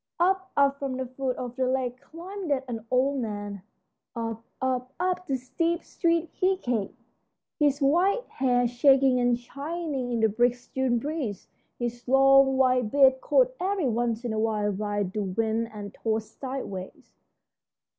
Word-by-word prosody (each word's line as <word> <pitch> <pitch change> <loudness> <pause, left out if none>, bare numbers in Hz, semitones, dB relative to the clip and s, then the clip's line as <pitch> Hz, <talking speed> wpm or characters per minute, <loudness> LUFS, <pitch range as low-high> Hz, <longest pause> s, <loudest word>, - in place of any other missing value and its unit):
Up, 375 +2 +1
up 280 0 +3
from 270 -2 -3
the 260 - -2
foot 255 0 -3
of 245 -1 -5
the 260 -1 0
lake 255 -1 -1
climbed 360 +4 -8
an 250 -5 -2
old 265 +2 +2
man; 205 -3 -5 0.5
up, 225 -1 -4 0.2
up, 255 0 -2
up 365 0 -1
the 270 - 0
steep 330 +7 -1
street 335 -1 0
he 375 +1 +1
came, 240 - -2 0.6
his 290 -1 +2
white 365 - +3
hair 245 -2 +1
shaking 265 +1 +4
and 245 -1 +2
shining 280 +1 -4
in 235 - 0
the 220 - +5
brisk 240 +3 0
June 260 -2 +1
breeze, 260 - -4 0.3
his 240 0 -4
long, 270 0 +5
white 255 -3 +3
beard 265 0 +5
caught - - +3
every 375 -4 0
once 235 0 -1
in 235 - -1
a 215 - -1
while 215 -2 0
by 205 +1 -1
the 195 +3 -3
wind 220 +4 -1
and 205 -2 -8
tossed 220 -1 -3
sideways. 255 -9 -6
255 Hz, 155 wpm, -27 LUFS, 230-280 Hz, 0.6 s, the